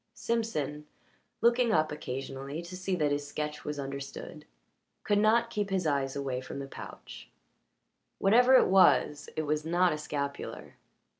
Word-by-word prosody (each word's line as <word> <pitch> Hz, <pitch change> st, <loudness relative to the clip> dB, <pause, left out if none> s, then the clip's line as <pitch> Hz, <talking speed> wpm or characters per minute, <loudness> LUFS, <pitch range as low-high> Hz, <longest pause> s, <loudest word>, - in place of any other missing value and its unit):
Simpson, 150 Hz, -11 st, -2 dB, 0.5 s
looking 235 Hz, +1 st, +4 dB
up 155 Hz, -6 st, +2 dB
occasionally 135 Hz, +2 st, -5 dB
to 175 Hz, +2 st, -8 dB
see 185 Hz, +1 st, -2 dB
that 150 Hz, -4 st, +1 dB
his 145 Hz, 0 st, -1 dB
sketch 150 Hz, +1 st, -4 dB
was 150 Hz, 0 st, -4 dB
understood, 140 Hz, 0 st, -7 dB, 0.6 s
could 205 Hz, 0 st, +2 dB
not 230 Hz, +2 st, +3 dB
keep 205 Hz, -2 st, -2 dB
his 190 Hz, -2 st, 0 dB
eyes 140 Hz, -3 st, 0 dB
away 135 Hz, -2 st, -2 dB
from 130 Hz, -, -8 dB
the 140 Hz, -, -4 dB
pouch 135 Hz, -, -10 dB, 0.9 s
whatever 245 Hz, +6 st, +5 dB
it -, -, +7 dB
was, 185 Hz, -6 st, +4 dB
it 155 Hz, -, -1 dB
was 150 Hz, 0 st, -1 dB
not 175 Hz, +1 st, +2 dB
a 150 Hz, -, -4 dB
scapular. 140 Hz, -2 st, -5 dB
150 Hz, 150 wpm, -30 LUFS, 140-195 Hz, 0.9 s, it